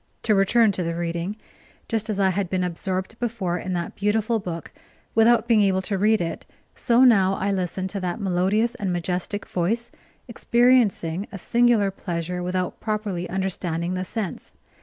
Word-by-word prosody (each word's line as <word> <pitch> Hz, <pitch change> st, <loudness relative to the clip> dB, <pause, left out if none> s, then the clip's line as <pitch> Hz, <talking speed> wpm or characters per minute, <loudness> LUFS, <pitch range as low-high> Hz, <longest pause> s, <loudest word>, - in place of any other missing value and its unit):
To 220 Hz, -, +3 dB
return 210 Hz, +3 st, +4 dB
to 190 Hz, -, -3 dB
the 165 Hz, -1 st, -2 dB
reading. 170 Hz, +3 st, -3 dB, 0.5 s
Just 225 Hz, -1 st, -1 dB
as 205 Hz, -2 st, -1 dB
I 190 Hz, -1 st, +3 dB
had 190 Hz, -1 st, -2 dB
been 185 Hz, 0 st, 0 dB
absorbed 185 Hz, +4 st, -3 dB
before 215 Hz, -7 st, -2 dB
in 185 Hz, -, -4 dB
that 175 Hz, -1 st, -3 dB
beautiful 215 Hz, +2 st, +1 dB
book 170 Hz, -4 st, -6 dB, 0.4 s
without 225 Hz, 0 st, +4 dB
being 225 Hz, -3 st, +4 dB
able 190 Hz, -2 st, +2 dB
to 200 Hz, -, -2 dB
read 215 Hz, +2 st, +3 dB
it, 165 Hz, -1 st, -3 dB, 0.3 s
so 240 Hz, +2 st, +3 dB
now 195 Hz, -6 st, +5 dB
I 200 Hz, +1 st, -1 dB
listened 185 Hz, 0 st, -2 dB
to 200 Hz, -, -3 dB
that 180 Hz, +3 st, -3 dB
melodious 195 Hz, +4 st, +1 dB
and 195 Hz, -3 st, -3 dB
majestic 180 Hz, +3 st, -2 dB
voice, 220 Hz, +7 st, -1 dB, 0.4 s
experiencing 235 Hz, -7 st, +2 dB
a 200 Hz, -, -6 dB
singular 235 Hz, -1 st, +2 dB
pleasure 180 Hz, -1 st, -4 dB
without 180 Hz, 0 st, -2 dB
properly 210 Hz, -5 st, -3 dB
understanding 180 Hz, -2 st, -2 dB
the 185 Hz, 0 st, -2 dB
sense. 195 Hz, -1 st, -5 dB
195 Hz, 165 wpm, -24 LUFS, 180-220 Hz, 0.5 s, now